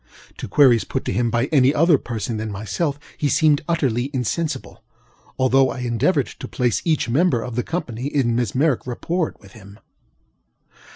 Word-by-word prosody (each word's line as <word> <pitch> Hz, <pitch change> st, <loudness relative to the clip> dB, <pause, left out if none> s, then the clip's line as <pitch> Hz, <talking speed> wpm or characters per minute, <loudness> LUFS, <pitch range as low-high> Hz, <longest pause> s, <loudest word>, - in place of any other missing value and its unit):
To -, -, -6 dB
queries 120 Hz, 0 st, +5 dB
put 130 Hz, -, -4 dB
to -, -, -2 dB
him 120 Hz, -1 st, +1 dB
by 120 Hz, +1 st, +1 dB
any 135 Hz, -2 st, +4 dB
other 160 Hz, -2 st, +4 dB
person 115 Hz, -1 st, -4 dB
than 110 Hz, 0 st, -4 dB
myself 125 Hz, -, -3 dB, 0.2 s
he 145 Hz, -, +1 dB
seemed 150 Hz, 0 st, +3 dB
utterly 135 Hz, -6 st, 0 dB
insensibleŌĆöalthough 135 Hz, -1 st, -2 dB
I -, -, -7 dB
endeavored 120 Hz, -2 st, +1 dB
to -, -, -9 dB
place 120 Hz, -6 st, 0 dB
each 160 Hz, -6 st, +1 dB
member 130 Hz, -1 st, +2 dB
of 125 Hz, -, -6 dB
the 125 Hz, -, +1 dB
company 125 Hz, -6 st, -4 dB
in 130 Hz, -5 st, 0 dB
mesmeric 125 Hz, +4 st, 0 dB
rapport 165 Hz, +7 st, -2 dB
with 100 Hz, -2 st, -17 dB
him. 100 Hz, -1 st, -14 dB
125 Hz, 160 wpm, -21 LUFS, 115-145 Hz, 0.2 s, queries